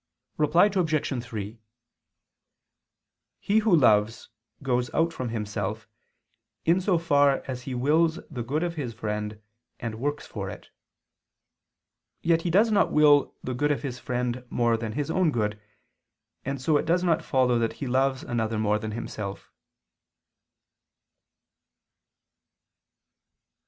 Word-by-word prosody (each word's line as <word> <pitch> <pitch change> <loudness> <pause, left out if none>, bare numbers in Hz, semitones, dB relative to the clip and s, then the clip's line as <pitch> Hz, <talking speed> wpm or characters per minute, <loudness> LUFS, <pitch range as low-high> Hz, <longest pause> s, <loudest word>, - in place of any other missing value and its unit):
Reply 155 +5 +4
Obj. 155 - 0
3: 110 -2 -6 1.8
He 210 +2 +2
who 215 -4 +4
loves, 110 -6 +3 0.3
goes 125 -2 0
out 165 0 +2
from 125 -5 -4
himself, 105 -1 -4 0.8
in 175 +3 +3
so 185 -2 +2
far 145 -4 +3
as 130 -2 -4
he 130 - -3
wills 160 +6 +2
the 125 -5 -4
good 145 +8 -1
of 175 -1 -2
his 130 -8 -5
friend 105 -1 -4 0.4
and 115 -2 -5
works 145 +3 -2
for - - -5
it. - - -11 1.5
Yet 165 0 +3
he 175 - -2
does 210 +6 +4
not 205 -2 +3
will 145 -2 +4
the 130 - -3
good 145 +4 +1
of 145 - -2
his 125 -3 -4
friend 125 0 -2
more 120 -1 +2
than 115 -1 -4
his 145 +5 -2
own 185 -2 +2
good: 105 -5 -2 0.8
and 135 +1 -3
so 150 +4 +2
it - - -2
does 175 +2 +2
not 170 -3 +2
follow 125 -3 +2
that 115 -1 0
he - - -6
loves 130 +1 +1
another 115 -2 -2
more 105 0 +1
than 110 0 -5
himself. 105 -3 -6
130 Hz, 135 wpm, -26 LUFS, 115-160 Hz, 1.8 s, Reply